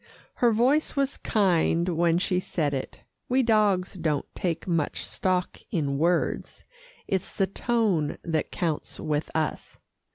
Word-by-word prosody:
Her 240 -1 +4
voice 255 +8 +2
was 275 0 0
kind 175 -4 +2
when 170 0 +2
she 180 0 +1
said 155 -5 -1
it. 135 - -5 0.3
We 260 +1 +3
dogs 210 -5 +2
don't 160 -6 -1
take 170 -1 -2
much 165 -4 -1
stock 185 -1 -1
in 140 -5 -1
words; 170 +2 0 0.4
it's 190 -2 -1
the 195 - +2
tone 195 -6 0
that 160 -2 -1
counts 165 -4 -3
with 150 0 -1
us. 155 -1 -2
180 Hz, 135 wpm, -26 LUFS, 160-210 Hz, 0.4 s, Her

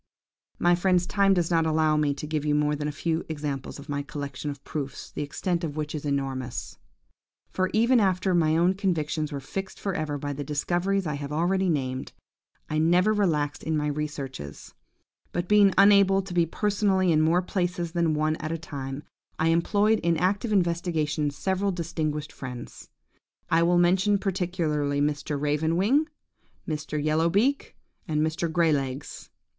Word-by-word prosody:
"My 175 0 +3
friends, 180 0 +2
time 195 0 +3
does 175 -1 0
not 165 -1 +3
allow 155 -1 +2
me 150 -2 +1
to 145 - -6
give 150 -1 -2
you 150 -1 +1
now - - +3
more 150 0 +1
than 150 0 -3
a - - -2
few 160 +3 -2
examples 145 -3 -4
of 140 +1 -11
my 145 -1 -2
collection 140 0 -5
of 140 -1 -7
proofs, 140 -3 -6
the - - -5
extent 170 +4 -2
of 150 -3 -3
which 150 -1 -3
is 150 -1 -5
enormous; 135 -3 -3 0.7
for 185 0 0
even 235 +3 +4
after 190 -2 +1
my 160 -2 +3
own 175 +3 +3
convictions 160 -6 -1
were 140 - -3
fixed 190 +8 -6
for 195 - -2
ever 155 -3 -2
by 145 0 -4
the 145 +1 -5
discoveries 175 +7 0
I 150 - -2
have 140 0 -5
already 180 +4 +1
named, 130 -4 -2 0.5
I 155 - -1
never 180 +6 +4
relaxed 155 -8 0
in 160 -1 -1
my 150 - -1
researches; 140 - -5 0.6
but 175 0 -2
being 205 -1 +6
unable 195 -1 +6
to 185 -1 -8
be 170 -1 +2
personally 195 -1 +1
in 155 -1 +4
more 170 +3 +3
places 180 -2 -2
than 170 -2 +1
one 155 +1 0
at 155 -1 -4
a 165 - -1
time, 140 -3 -6 0.3
I 160 - +2
employed 205 +6 +2
in 170 -1 +1
active 200 +6 0
investigations 165 -5 0
several 190 +5 0
distinguished 155 -4 -3
friends; 125 -2 -9 0.6
I 165 0 +4
will 175 +1 +3
mention 190 +4 +3
particularly 170 -7 -1
Mr. 145 0 -1
Raven 150 +3 0
wing, 275 - +2 0.6
Mr. 155 -1 -3
Yellow 155 +3 +2
beak, 245 +10 +1 0.3
and 155 -1 +1
Mr. 160 +1 -2
Grey 165 -1 +3
legs. 135 0 -4
160 Hz, 175 wpm, -26 LUFS, 150-185 Hz, 0.7 s, being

